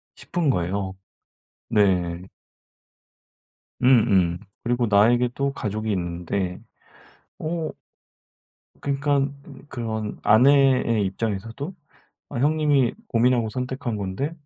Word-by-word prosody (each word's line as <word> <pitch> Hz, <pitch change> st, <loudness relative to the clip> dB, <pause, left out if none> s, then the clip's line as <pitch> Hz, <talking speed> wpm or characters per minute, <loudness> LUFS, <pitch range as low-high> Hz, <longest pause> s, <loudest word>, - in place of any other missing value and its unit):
싶은 170 Hz, -4 st, -2 dB
거예요. 95 Hz, -2 st, -1 dB, 0.7 s
네. 90 Hz, -4 st, +1 dB, 1.5 s
음음. 100 Hz, -9 st, +4 dB, 0.2 s
그리고 120 Hz, 0 st, +1 dB
나에게 115 Hz, +4 st, +4 dB
또 140 Hz, 0 st, -1 dB
가족이 110 Hz, -2 st, -3 dB
있는데 90 Hz, 0 st, -2 dB, 0.8 s
어 160 Hz, 0 st, -2 dB, 1.1 s
그니깐 140 Hz, 0 st, 0 dB
음 140 Hz, -1 st, -13 dB
그런 110 Hz, -5 st, -4 dB
아내의 125 Hz, -2 st, +4 dB
입장에서도 115 Hz, -, -4 dB, 0.6 s
"아 140 Hz, -, -4 dB
형님이 145 Hz, -2 st, +2 dB
고민하고 120 Hz, -1 st, +2 dB
선택한 125 Hz, -1 st, -3 dB
건데 100 Hz, +10 st, -3 dB
115 Hz, 205 characters per minute, -24 LUFS, 100-135 Hz, 1.5 s, 음음